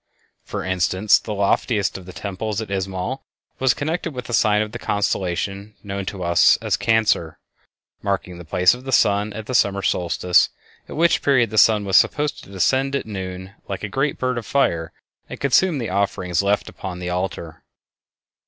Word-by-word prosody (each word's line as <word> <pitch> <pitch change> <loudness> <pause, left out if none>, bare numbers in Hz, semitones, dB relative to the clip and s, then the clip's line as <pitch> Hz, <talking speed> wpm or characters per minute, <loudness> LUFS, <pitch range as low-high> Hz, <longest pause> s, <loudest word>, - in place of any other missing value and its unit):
For - - -5
instance, 95 +2 +2
the 110 - -7
loftiest 100 0 +1
of 95 -2 -8
the - - -8
temples 100 +4 -4
at 110 -3 -6
Izamal 95 +6 -3 0.4
was 130 -2 +3
connected 160 +1 -3
with 125 -1 -5
the 120 - -6
sign 105 0 +3
of 105 - -7
the - - -7
constellation 100 +1 -2
known 100 -1 -5
to 95 -2 -4
us 85 0 +5
as - - -1
Cancer, 110 -8 +1 0.6
marking 95 -3 -3
the - - -8
place 90 +3 +3
of 125 +1 -9
the 135 - -5
sun 105 -3 +3
at 110 0 -7
the 130 - -5
summer 100 -4 +2
solstice, 90 0 +2 0.4
at - - -7
which 170 +2 +3
period 125 -6 +3
the 110 - -4
sun 105 -2 +5
was 95 -2 +4
supposed 150 0 +1
to - - -15
descend 130 +9 +1
at - - -2
noon 95 -2 -6
like 100 +1 -5
a - - -1
great 135 +7 -1
bird 125 -1 -1
of 115 - -10
fire 85 - +1 0.4
and - - -8
consume 150 +5 +3
the 115 -7 -3
offerings 95 -3 0
left 100 +1 0
upon 95 -2 -7
the 90 0 -4
altar. 90 -3 -4
100 Hz, 185 wpm, -21 LUFS, 95-120 Hz, 0.6 s, us